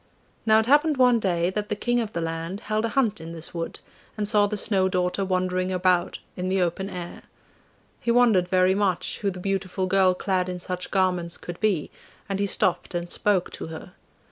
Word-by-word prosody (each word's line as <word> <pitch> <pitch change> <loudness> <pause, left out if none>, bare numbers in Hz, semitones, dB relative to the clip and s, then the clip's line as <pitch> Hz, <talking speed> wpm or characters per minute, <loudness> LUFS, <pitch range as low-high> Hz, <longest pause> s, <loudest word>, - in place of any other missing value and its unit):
Now 220 0 +6
it 220 - +3
happened 295 +3 +4
one 250 -2 +5
day 175 -3 0
that 210 +1 -3
the 210 - 0
King 240 +3 0
of 220 -3 -2
the 170 - -2
land 165 +4 -4
held 215 0 -1
a - - -1
hunt 225 -8 0
in 165 +1 -7
this 165 -1 -8
wood, 165 -1 -4 0.4
and 210 -1 0
saw 210 -1 +4
the 210 +1 -3
Snow 195 -2 +1
daughter 180 +1 0
wandering 185 0 0
about 180 -1 +1 0.2
in 185 0 -3
the 190 +1 +1
open 180 +2 -1
air. 175 -2 -7 0.8
He - - -4
wondered 230 -7 +4
very 185 0 +3
much 195 -3 -1
who 200 - 0
the 185 -1 -6
beautiful 190 0 -2
girl 185 -1 +3
clad 185 -1 0
in 180 - -4
such 180 0 -5
garments 180 -3 0
could 175 0 -8
be, 200 -8 0 0.4
and 195 -1 -2
he 200 - +1
stopped 175 -1 0
and 175 0 -3
spoke 200 -4 +1
to - - -7
her. 160 +2 -9
185 Hz, 205 wpm, -25 LUFS, 180-210 Hz, 0.8 s, Now